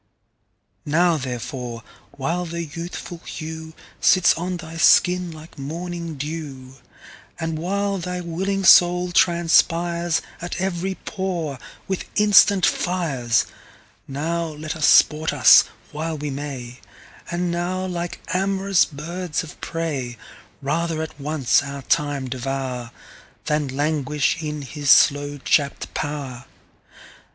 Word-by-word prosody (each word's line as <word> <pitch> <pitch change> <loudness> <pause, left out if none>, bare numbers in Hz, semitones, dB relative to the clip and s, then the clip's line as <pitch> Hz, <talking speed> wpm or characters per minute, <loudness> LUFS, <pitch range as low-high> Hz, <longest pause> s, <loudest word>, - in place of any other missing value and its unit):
Now 170 +3 +3
therefore, 125 -3 -5 0.3
while 170 +6 -2
the 170 +1 -4
youthful 170 +2 -7
hewSits 160 +2 0
on 180 +2 -3
thy 165 -1 -9
skin 180 +1 +4
like 155 -2 -12
morning 170 +3 -5
[dew]And 145 +2 -7
while 200 +3 -1
thy 180 +1 -4
willing 190 +3 -2
Soul 180 +1 +6
transpiresAt 170 0 +1
every 190 0 -2
pore 175 - -4 0.3
with 190 -1 -3
instant 205 -2 +6
Fires, 150 -10 +1 0.6
Now 165 +5 -2
let 155 -1 -5
us 155 -2 +2
sport 155 +1 +5
us - - +7 0.3
while 160 +1 -3
we 145 0 -4
may; 135 -3 -6 0.5
And 175 0 -1
now, 180 +2 -2
like 175 -2 -4
am'rous 195 0 +2
birds 170 +3 -4
of 160 - -12
prey, 140 -8 -3 0.5
Rather 160 +3 -1
at 155 -1 -9
once 140 -5 +2
our 140 -1 -7
Time 145 -4 0
devour, 130 -1 -4 0.6
Than 150 -1 0
languish 145 +2 0
in 150 -2 -4
his 140 +2 -4
slow 145 +1 +5
chapt 140 +1 0
pow'r. 140 -5 -4
160 Hz, 110 wpm, -22 LUFS, 145-175 Hz, 0.6 s, us